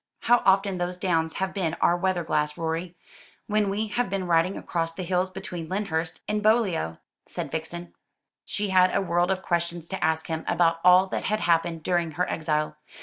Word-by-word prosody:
"How 240 Hz, 0 st, +4 dB
often 195 Hz, -1 st, +3 dB
those 175 Hz, 0 st, -2 dB
downs 165 Hz, -3 st, 0 dB
have 190 Hz, 0 st, -2 dB
been 170 Hz, -5 st, -1 dB
our 170 Hz, -, +3 dB
weather 180 Hz, -1 st, 0 dB
glass, 150 Hz, -1 st, -1 dB
Rorie, 165 Hz, +2 st, -3 dB, 0.5 s
when 210 Hz, -1 st, +1 dB
we 205 Hz, +3 st, -1 dB
have 240 Hz, +1 st, -1 dB
been 195 Hz, -1 st, -2 dB
riding 170 Hz, +2 st, +2 dB
across 165 Hz, -1 st, -2 dB
the 185 Hz, +3 st, -6 dB
hills 180 Hz, +1 st, 0 dB
between 180 Hz, -3 st, -6 dB
Lyndhurst 175 Hz, -4 st, -2 dB
and 210 Hz, 0 st, 0 dB
Beaulieu," 210 Hz, -, +2 dB, 0.3 s
said -, -, -5 dB
Vixen. 170 Hz, +2 st, -5 dB, 0.5 s
She 205 Hz, -1 st, -3 dB
had 185 Hz, -1 st, +4 dB
a -, -, +3 dB
world 175 Hz, -1 st, +1 dB
of 190 Hz, 0 st, -1 dB
questions 170 Hz, -1 st, -2 dB
to 190 Hz, -, -4 dB
ask 160 Hz, 0 st, +1 dB
him 160 Hz, -1 st, -3 dB
about 165 Hz, -1 st, +2 dB
all 180 Hz, +1 st, +7 dB
that -, -, -3 dB
had 215 Hz, +1 st, 0 dB
happened 165 Hz, -1 st, +1 dB
during 170 Hz, -2 st, 0 dB
her 180 Hz, +4 st, 0 dB
exile. 155 Hz, -1 st, -1 dB
175 Hz, 190 wpm, -26 LUFS, 165-190 Hz, 0.5 s, all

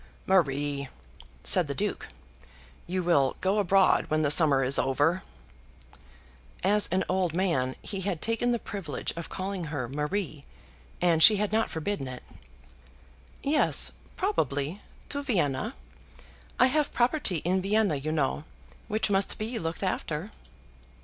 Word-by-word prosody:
"Marie," 145 Hz, -6 st, +1 dB, 0.5 s
said 65 Hz, -, +5 dB
the -, -, -4 dB
Duke, -, -, -3 dB, 0.8 s
"you 185 Hz, +1 st, -2 dB
will 140 Hz, -7 st, +2 dB
go 195 Hz, +3 st, +1 dB
abroad 195 Hz, -1 st, +3 dB
when 155 Hz, 0 st, +1 dB
the 145 Hz, -, +3 dB
summer 145 Hz, -4 st, +4 dB
is 130 Hz, +2 st, +3 dB
over." 145 Hz, +7 st, +1 dB, 1.4 s
As 205 Hz, +2 st, +3 dB
an 185 Hz, +2 st, 0 dB
old 180 Hz, -3 st, 0 dB
man 150 Hz, -9 st, 0 dB
he 195 Hz, -2 st, -5 dB
had 185 Hz, -4 st, -2 dB
taken 230 Hz, +4 st, 0 dB
the 240 Hz, -, +1 dB
privilege 195 Hz, -9 st, -5 dB
of 170 Hz, 0 st, -6 dB
calling 190 Hz, -2 st, -4 dB
her 145 Hz, -5 st, -4 dB
Marie, 150 Hz, +2 st, -3 dB, 0.6 s
and 170 Hz, -2 st, +3 dB
she 215 Hz, +5 st, +9 dB
had 210 Hz, 0 st, -1 dB
not 220 Hz, +1 st, +1 dB
forbidden 160 Hz, -3 st, -3 dB
it. 130 Hz, -1 st, -8 dB, 1.2 s
Yes, 295 Hz, +2 st, +3 dB, 0.2 s
probably; 175 Hz, -, -1 dB, 0.3 s
to 285 Hz, -, -3 dB
Vienna. 205 Hz, -, -1 dB, 0.8 s
I 255 Hz, -, +7 dB
have 290 Hz, +3 st, +1 dB
property 240 Hz, -, +1 dB
in 185 Hz, +2 st, +1 dB
Vienna 200 Hz, -3 st, +2 dB
you 150 Hz, +3 st, -3 dB
know, 145 Hz, -1 st, -1 dB, 0.4 s
which 215 Hz, 0 st, +1 dB
must 195 Hz, 0 st, +1 dB
be 225 Hz, +2 st, -3 dB
looked 165 Hz, +3 st, -4 dB
after. 185 Hz, 0 st, -3 dB
185 Hz, 135 wpm, -28 LUFS, 150-205 Hz, 1.4 s, she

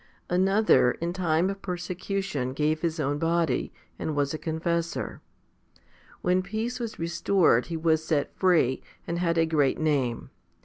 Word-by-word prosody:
15. 180 Hz, +1 st, +2 dB
Another 195 Hz, -, +4 dB
in 170 Hz, +1 st, -3 dB
time 175 Hz, -1 st, +1 dB
of 195 Hz, 0 st, -8 dB
persecution 180 Hz, -6 st, -3 dB
gave 155 Hz, +2 st, 0 dB
his 165 Hz, -1 st, -1 dB
own 145 Hz, 0 st, 0 dB
body, 165 Hz, -5 st, 0 dB, 0.3 s
and 155 Hz, -, -2 dB
was 145 Hz, 0 st, 0 dB
a 155 Hz, -, -4 dB
confessor. 170 Hz, +1 st, -2 dB, 1.0 s
When 180 Hz, +1 st, +3 dB
peace 220 Hz, +6 st, -3 dB
was 230 Hz, -2 st, -5 dB
restored, 170 Hz, -5 st, +2 dB
he 165 Hz, -, -3 dB
was 160 Hz, -1 st, +2 dB
set 150 Hz, -3 st, 0 dB
free, 170 Hz, -9 st, +3 dB, 0.2 s
and 170 Hz, +1 st, -3 dB
had 170 Hz, -1 st, +1 dB
a 165 Hz, -, +4 dB
great 150 Hz, -4 st, +2 dB
name. 140 Hz, -7 st, 0 dB
165 Hz, 150 wpm, -27 LUFS, 155-180 Hz, 1.0 s, Another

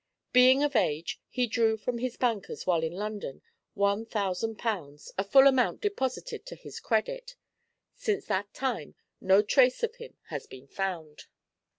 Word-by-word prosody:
Being 255 Hz, +2 st, +7 dB
of 290 Hz, -2 st, 0 dB
age, 165 Hz, -6 st, 0 dB
he 250 Hz, -1 st, +1 dB
drew 225 Hz, -1 st, +2 dB
from 235 Hz, +2 st, -3 dB
his 250 Hz, 0 st, -3 dB
bankers 230 Hz, -6 st, -1 dB
while 175 Hz, -3 st, +2 dB
in 160 Hz, 0 st, -1 dB
London 205 Hz, -7 st, -5 dB, 0.3 s
one 200 Hz, +1 st, +1 dB
thousand 210 Hz, 0 st, -2 dB
pounds, 160 Hz, -11 st, -4 dB
the 195 Hz, -, 0 dB
full 270 Hz, +7 st, +6 dB
amount 260 Hz, -3 st, +4 dB
deposited 405 Hz, -, -3 dB
to -, -, -7 dB
his -, -, -10 dB
credit; -, -, -1 dB, 0.6 s
since 420 Hz, -3 st, -2 dB
that 200 Hz, +2 st, -1 dB
time 255 Hz, -, -3 dB, 0.3 s
no 190 Hz, +2 st, +5 dB
trace 255 Hz, -, +3 dB
of 465 Hz, +1 st, -1 dB
him 475 Hz, 0 st, -11 dB
has -, -, -5 dB
been 130 Hz, +1 st, -12 dB
found. 165 Hz, -2 st, -5 dB
225 Hz, 160 wpm, -29 LUFS, 190-260 Hz, 0.6 s, Being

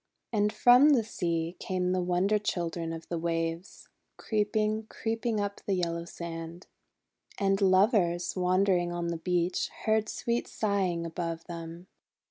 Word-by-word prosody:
And 210 Hz, -1 st, +2 dB
from 245 Hz, +6 st, +6 dB
the 240 Hz, -5 st, +3 dB
sea 170 Hz, -4 st, -2 dB
came 180 Hz, -1 st, -1 dB
the 185 Hz, 0 st, +1 dB
Wonder 180 Hz, +4 st, +2 dB
Children 170 Hz, -4 st, -2 dB
of 165 Hz, 0 st, -7 dB
the 170 Hz, -, -3 dB
Waves, 165 Hz, +1 st, -3 dB, 0.3 s
creeping, 215 Hz, 0 st, 0 dB
creeping 225 Hz, 0 st, -2 dB
up 200 Hz, 0 st, -3 dB
the 195 Hz, -, +2 dB
yellow 170 Hz, -2 st, -2 dB
sand. 170 Hz, 0 st, -7 dB, 0.7 s
And 195 Hz, 0 st, +1 dB
Lovers, 185 Hz, -3 st, +3 dB
wandering 180 Hz, -1 st, +2 dB
on 175 Hz, 0 st, -2 dB
the 170 Hz, -, -2 dB
beach, 175 Hz, +1 st, 0 dB, 0.2 s
heard 220 Hz, -1 st, +2 dB
sweet 235 Hz, 0 st, -2 dB
sighing 190 Hz, -5 st, -1 dB
above 165 Hz, 0 st, -4 dB
them. 170 Hz, 0 st, -8 dB
180 Hz, 135 wpm, -29 LUFS, 170-210 Hz, 0.7 s, from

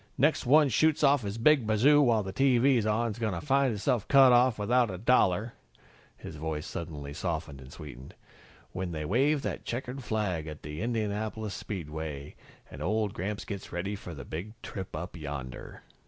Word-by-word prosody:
"Next 145 Hz, -2 st, +2 dB
one 150 Hz, +2 st, +6 dB
shoots 155 Hz, +5 st, +2 dB
off 140 Hz, -1 st, +5 dB
his 100 Hz, 0 st, -4 dB
big 130 Hz, 0 st, +4 dB
bazoo 135 Hz, +8 st, +5 dB
while 115 Hz, -6 st, +3 dB
the 95 Hz, 0 st, -6 dB
TV's 130 Hz, -3 st, +3 dB
on 115 Hz, +2 st, +1 dB
is 105 Hz, -, -8 dB
gonna 105 Hz, -7 st, -1 dB
find 140 Hz, -2 st, +2 dB
hisself 110 Hz, +1 st, -1 dB
cut 135 Hz, -2 st, +7 dB
off 125 Hz, -1 st, +4 dB
without 120 Hz, +3 st, +2 dB
a 95 Hz, -, -5 dB
dollar 110 Hz, 0 st, +2 dB, 0.3 s
" -, -, -29 dB
his 80 Hz, -, -9 dB
voice 80 Hz, 0 st, -4 dB
suddenly 75 Hz, -5 st, -6 dB
softened 80 Hz, -4 st, -4 dB
and 65 Hz, +1 st, -12 dB
sweetened 70 Hz, -4 st, -11 dB, 0.6 s
"when 90 Hz, -2 st, -4 dB
they 75 Hz, -1 st, -4 dB
wave 135 Hz, -, +2 dB
that -, -, -4 dB
checkered 125 Hz, +2 st, -5 dB
flag 95 Hz, -9 st, -2 dB
at 75 Hz, -1 st, -8 dB
the 75 Hz, +3 st, -6 dB
Indianapolis 110 Hz, -2 st, -2 dB
Speedway, 80 Hz, -6 st, -6 dB, 0.4 s
and 70 Hz, -, -9 dB
old 105 Hz, +4 st, 0 dB
Gramps 100 Hz, +3 st, -4 dB
gets 100 Hz, -2 st, -7 dB
ready 95 Hz, +4 st, -3 dB
for 90 Hz, -4 st, -9 dB
the 70 Hz, -, -8 dB
Big 105 Hz, +8 st, -7 dB
Trip 95 Hz, -2 st, -6 dB
Up 90 Hz, +1 st, -6 dB
Yonder." 70 Hz, -5 st, -7 dB
105 Hz, 180 wpm, -29 LUFS, 80-120 Hz, 0.6 s, cut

